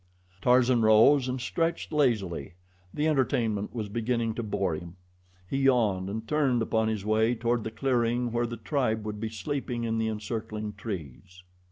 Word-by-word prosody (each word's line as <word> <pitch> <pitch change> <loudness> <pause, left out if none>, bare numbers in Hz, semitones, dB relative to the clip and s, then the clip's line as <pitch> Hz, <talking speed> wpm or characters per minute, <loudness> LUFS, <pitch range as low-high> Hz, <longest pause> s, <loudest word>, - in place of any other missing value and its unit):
Tarzan 125 +1 +4
rose 115 +5 +5
and 130 +1 -2
stretched 165 +9 -2
lazily. 105 - 0 0.4
The 150 +8 0
entertainment 120 -8 0
was 110 -3 -3
beginning 115 +1 -1
to 120 - -4
bore 100 -5 -1
him. 85 +2 -7 0.5
He 135 - -2
yawned 110 -9 +2
and 110 +2 -5
turned 135 -6 +2
upon 110 0 +1
his 110 -3 -2
way 110 +2 +2
toward 120 0 0
the - - -3
clearing 120 0 0
where 120 +1 0
the 120 0 -6
tribe 110 -3 -1
would 105 -1 -4
be 110 +1 -3
sleeping 120 +3 -3
in 115 -1 -1
the 110 - 0
encircling 110 -1 -4
trees. 95 - -8
115 Hz, 165 wpm, -28 LUFS, 105-125 Hz, 0.5 s, rose